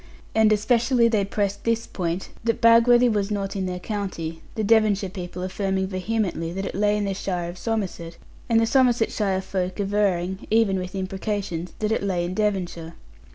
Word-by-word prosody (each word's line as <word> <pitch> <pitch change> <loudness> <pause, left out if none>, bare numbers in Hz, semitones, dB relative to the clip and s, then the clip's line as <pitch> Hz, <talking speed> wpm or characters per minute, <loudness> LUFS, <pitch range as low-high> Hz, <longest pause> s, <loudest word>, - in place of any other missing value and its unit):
And 220 -1 +4
especially 235 +3 +3
they 215 -3 +2
pressed 200 0 -2
this 230 0 0
point, 175 0 -3
that 230 -1 0
Bagworthy 235 +2 +6
was 205 -3 0
not 200 -1 -2
in 190 -1 -1
their 180 0 -3
county; 180 -5 -4
the 220 - -1
Devonshire 210 -3 +3
people 180 -2 -6
affirming 190 0 -1
vehemently 185 -3 -2
that 195 +1 -3
it - - -4
lay 210 +1 +2
in 205 - -1
the 195 - -1
shire 180 -3 -3
of 175 - -13
Somerset, 185 -7 -3 0.3
and 230 -1 +4
the 225 - +3
Somersetshire 225 -6 +2
folk 185 0 -3
averring, 195 -2 0
even 215 -4 +3
with 185 +1 -6
imprecations, 190 -2 -3
that 215 0 -1
it 220 - +1
lay 185 -3 -1
in 175 - -4
Devonshire. 180 -5 -2
200 Hz, 175 wpm, -24 LUFS, 185-220 Hz, 0.3 s, Bagworthy